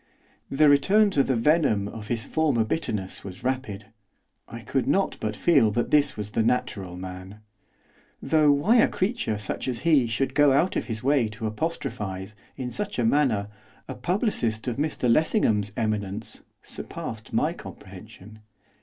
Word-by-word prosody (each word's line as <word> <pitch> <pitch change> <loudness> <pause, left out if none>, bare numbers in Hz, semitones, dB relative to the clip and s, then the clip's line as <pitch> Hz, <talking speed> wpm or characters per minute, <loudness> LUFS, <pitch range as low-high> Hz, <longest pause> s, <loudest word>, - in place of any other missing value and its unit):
The 150 +2 +4
return 195 +9 +4
to 145 - +3
the 135 -1 +1
venom 115 -5 +2
of 105 0 -8
his 115 -1 -2
former 150 -8 +1
bitterness 105 - -3
was 95 +2 -9
rapid, 125 -6 -3 0.6
I - - -9
could - - -1
not - - +1
but 105 -1 -3
feel 140 -5 +4
that 120 +2 -1
this 145 -4 +3
was 105 0 -5
the 115 - +1
natural 100 -6 -1
man. 95 +3 -9 0.8
Though 155 -2 +3
why 170 +12 +3
a 230 - +6
creature 190 - -1
such 105 +4 -4
as 125 -2 -3
he 155 -5 +4
was 120 - -3
should 130 +4 -1
go 145 -1 +5
out 170 +7 +2
of - - -1
his 110 -1 -4
way 135 -3 +3
to 110 +2 -7
apostrophise, 105 - -4 0.2
in 125 -2 -4
such 205 +5 -3
a 120 - +1
manner, 115 -6 +2 0.4
a - - -5
publicist 175 - -1
of 125 - -2
Mr 145 -3 -1
Lessingham's 115 - +2
eminence, 110 -1 -3 0.2
surpassed - - -7
my - - +1
comprehension. 110 +4 -12
120 Hz, 165 wpm, -25 LUFS, 105-150 Hz, 0.8 s, a